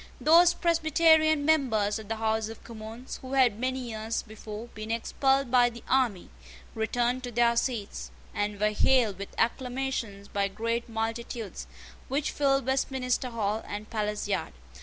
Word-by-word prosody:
Those 340 +3 +6
Presbyterian 315 -2 +4
members 225 -9 +2
of 215 - -10
the 225 - -2
House 220 0 0
of 225 - -10
Commons 225 +2 -8
who 260 +1 -7
had 250 -6 +3
many 255 -1 -2
years 220 +1 -3
before 215 0 -8
been 215 -1 -8
expelled 265 +3 +1
by 245 -1 +5
the 235 -1 -11
army, 245 -9 +1 0.4
returned 240 +3 0
to 245 -1 -6
their 235 0 +3
seats, 235 -4 -2 0.2
and 205 0 -2
were 210 +1 +2
hailed 215 -3 +3
with 200 - -7
acclamations 245 -4 -2
by 200 -1 0
great 230 +4 -2
multitudes, 225 -1 -4 0.4
which 285 +2 -1
filled 275 -3 +2
Westminster 260 -1 0
Hall 220 -2 -2
and 210 +1 -6
Palace 210 -2 -2
Yard. 200 - -2
235 Hz, 150 wpm, -28 LUFS, 215-265 Hz, 0.4 s, Those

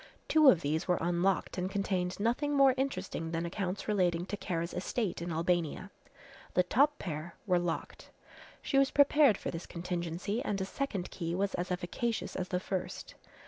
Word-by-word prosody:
Two 310 -3 +7
of 180 - +5
these 155 +4 -1
were 180 -1 +3
unlocked 175 +3 0
and 180 +1 -1
contained 190 -2 -1
nothing 250 +7 +1
more 270 -1 +6
interesting 195 -11 -2
than 165 +1 -2
accounts 185 +2 -3
relating 180 -5 +1
to 205 - -4
Kara's 170 -3 -3
estate 190 0 -2
in 170 0 -3
Albania. 175 +3 -1 0.6
The 180 - +5
top 285 +10 +3
pair 165 -1 -5
were 180 -3 +3
locked. 175 -2 -4 0.5
She 275 - +2
was 275 0 +4
prepared 285 -5 +5
for - - -4
this 165 0 -6
contingency 175 +4 -3
and 205 -6 -1
a 190 - -1
second 200 -5 -3
key 170 -2 -3
was 195 +1 0
as 180 +1 -2
efficacious 185 +6 -2
as 185 -1 -2
the 180 - -1
first. 185 0 -4
185 Hz, 175 wpm, -32 LUFS, 175-210 Hz, 0.6 s, Two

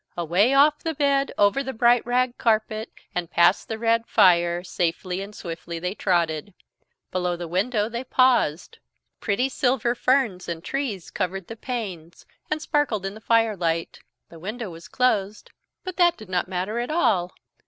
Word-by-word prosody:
Away 180 - +2
off 295 +2 +5
the 325 -1 -3
bed, 280 -1 +1
over 205 +7 +3
the 265 -1 -5
bright 240 0 +4
rag 250 0 +1
carpet, 220 -1 0 0.2
and 175 -2 -3
past 175 +2 +3
the 220 - -4
red 230 0 +1
fire, 175 -3 +4
safely 180 +1 -2
and 205 +1 -8
swiftly 170 -1 -6
they 180 +3 -3
trotted. 175 -2 -1 0.6
Below 180 -1 -1
the 175 0 -6
window 205 +5 0
they 235 +2 -5
paused. 255 - +2 0.4
Pretty 220 +5 0
silver 250 -3 +1
ferns 245 -8 +1
and 165 -1 -5
trees 255 -10 -4
covered 190 0 -3
the 225 - -8
panes 200 -10 -6 0.2
and 305 0 -2
sparkled 285 -12 0
in 195 - -3
the 215 - -12
firelight. 200 -8 +1 0.3
The 165 - -13
window 215 +3 -5
was 165 0 -11
closed, 215 -5 0 0.3
but 370 -1 -6
that 345 -1 +4
did 215 - -12
not 180 -1 0
matter 190 +5 -2
at 240 - -3
all. 190 - +1
210 Hz, 165 wpm, -24 LUFS, 180-250 Hz, 0.6 s, off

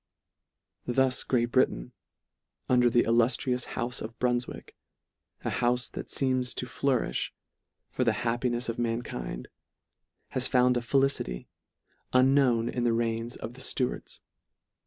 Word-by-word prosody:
Thus 130 +1 +2
Great 120 -2 +1
Britain, - - +1 0.8
under 125 -1 +4
the 120 0 +4
illuftrious 120 +2 +1
houfe 125 +1 -2
of 115 +1 -7
Brunfwick, 125 0 -2 0.7
a - - 0
houfe 125 0 0
that - - -6
feems 130 -2 +1
to - - -3
flourifh 125 - 0 0.6
for 125 - 0
the 115 -3 +3
happinefs 120 +1 0
of 115 0 -3
mankind, 115 - -3 0.8
has 130 -1 +1
found 125 0 +3
a 120 - +1
felicity, 135 - 0 0.6
unknown 130 -3 +4
in 120 - -2
the 120 -1 +2
reigns 115 +1 -1
of 110 - -7
the 130 - -9
Stuarts. 125 -1 -2
120 Hz, 125 wpm, -28 LUFS, 115-125 Hz, 0.8 s, under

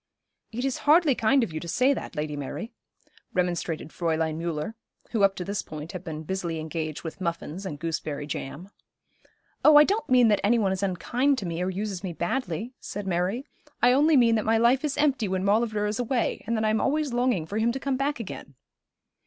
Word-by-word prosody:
'It 245 +4 -3
is 270 - -1
hardly 315 -2 +6
kind 250 +3 +3
of 200 - -4
you 155 - -3
to 170 - -8
say 255 +10 +3
that, 260 - -6
Lady 150 0 -3
Mary,' 145 - -5 0.6
remonstrated 175 -3 -1
Fräulein 160 -2 -1
Müller, 165 +3 -3 0.4
who, 225 - 0
up 195 -1 +4
to 180 - -5
this 200 +1 -2
point, 155 +2 -8
had 185 -1 -7
been 160 -2 -6
busily 170 -1 -3
engaged 155 -1 -4
with 165 +3 -7
muffins 170 +2 -3
and 150 - -5
gooseberry 150 -2 -3
jam. 150 +5 -6 0.9
'Oh, 305 - +8
I 295 - +10
don't 410 +8 -1
mean 250 -2 +6
that 205 - +3
any 235 +4 +4
one 200 -4 +1
is 190 0 -2
unkind 245 +9 +1
to 205 - -4
me 170 0 -3
or 180 - 0
uses 195 0 -4
me 180 -3 -3
badly,' 210 +5 -2
said 205 0 -6
Mary. 190 +8 -1 0.4
'I 245 - +7
only 295 +3 +5
mean 235 -2 +5
that 220 -2 +1
my 225 +1 +3
life 240 +4 +3
is 295 -2 -1
empty 275 -7 +2
when 190 0 -1
Maulevrier 215 0 +2
is 210 +2 -2
away, 245 0 -1
and 230 0 0
that 220 - 0
I 215 - +3
am 220 - +1
always 290 -1 0
longing 245 -9 +1
for 205 +6 -3
him 230 +2 +2
to 265 - -4
come 275 0 -1
back 275 +1 -1
again.' 185 - -8
200 Hz, 215 wpm, -26 LUFS, 170-245 Hz, 0.9 s, I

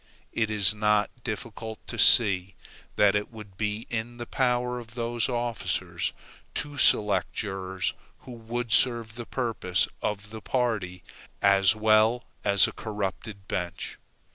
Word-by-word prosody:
It 110 -2 0
is 105 -2 +3
not 105 0 +2
difficult 110 -1 -5
to - - -6
see, 95 -4 +5 0.4
that 100 -1 +5
it 105 0 -1
would 105 -4 -12
be 105 +2 -2
in 120 +1 -3
the 120 - -5
power 125 0 0
of 115 -1 -12
those 120 0 0
officers 120 -2 -2 0.4
to 145 0 -3
select 105 -8 +3
jurors 95 -2 -2 0.3
who 130 - -11
would 120 0 -5
serve 115 -1 +3
the 120 0 -8
purpose 110 -7 0
of 105 0 -3
the 110 0 -8
party 105 -9 -1 0.4
as 100 0 +5
well 110 +2 +3 0.2
as 100 -2 +5
a - - -5
corrupted 100 -1 -5
bench. 90 0 -4
110 Hz, 140 wpm, -27 LUFS, 100-120 Hz, 0.4 s, see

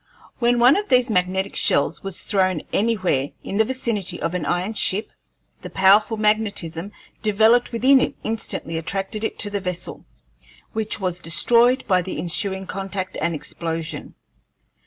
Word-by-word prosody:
When 240 0 +2
one 245 +6 +6
of 415 0 -3
these 250 -2 +3
magnetic 190 0 0
shells - - +1
was 195 -2 -4
thrown 185 -5 0
anywhere 185 -11 +1
in 200 - -3
the - - +6
vicinity 215 -8 -3
of 165 - -2
an 170 -5 -3
iron 180 +7 -1
ship, 210 0 +2 0.5
the - - -8
powerful 205 +4 +4
magnetism 205 -5 -1 0.3
developed 220 +3 +3
within 260 +3 +4
it - - -1
instantly 215 -7 -3
attracted 195 +5 -3
it - - -3
to 205 - 0
the 200 -1 -2
vessel, 180 -1 -5 0.7
which 220 -1 -1
was 180 -2 -1
destroyed 235 +10 +3
by 185 -3 +3
the 180 - -6
ensuing 190 +2 -1
contact 190 0 -4
and 170 +1 0
explosion. 160 +2 -4
195 Hz, 150 wpm, -22 LUFS, 180-225 Hz, 0.7 s, one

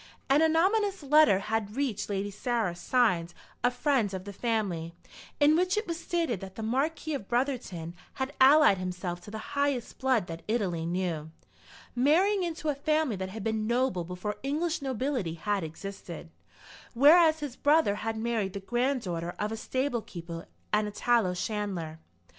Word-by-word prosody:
An 285 +3 +5
anonymous 380 +4 +2
letter 295 -6 +6
had 210 +1 -2
reached 270 -8 -2
Lady 200 0 -2
Sarah, 220 -3 -1
signed, 175 -6 +1 0.3
"A 245 - +5
Friend 245 -4 +1
of 185 - -5
the 200 +1 -8
Family," 190 -7 -2 0.4
in 295 +1 +5
which 365 +3 +2
it 425 - 0
was 335 -1 -4
stated 330 - -1
that 190 0 -9
the 220 - -5
Marquis 300 +7 -1
of 225 -9 -4
Brotherton 240 -10 -2 0.2
had 265 +1 -3
allied 270 -7 +7
himself 180 -1 -4
to 190 - -11
the 220 - -6 0.2
highest 280 -4 -1
blood 260 -7 +2
that 165 -1 -7
Italy 185 -8 -1
knew, 170 -3 -2 0.7
marrying 350 +11 +3
into 335 -2 -2
a - - +2
family 305 -3 0
that 190 0 -4
had 215 +1 -7
been 220 0 -1
noble 240 -6 +1
before 180 +4 -5
English 315 +5 -1
nobility 255 - -2
had 200 +3 -1
existed, 170 0 -8 0.6
whereas 315 +4 +6
his 285 -4 -5
brother 295 -7 +3
had 225 +1 -3
married 220 -4 -1
the 200 - -4
granddaughter 195 -7 -1
of 210 +1 -2
a - - -2
stable 255 +2 -1
keeper 170 -3 -8 0.3
and 210 0 +2
a - - -5
tallow 215 -4 +2
chandler. 180 -6 -3
225 Hz, 165 wpm, -29 LUFS, 190-285 Hz, 0.7 s, allied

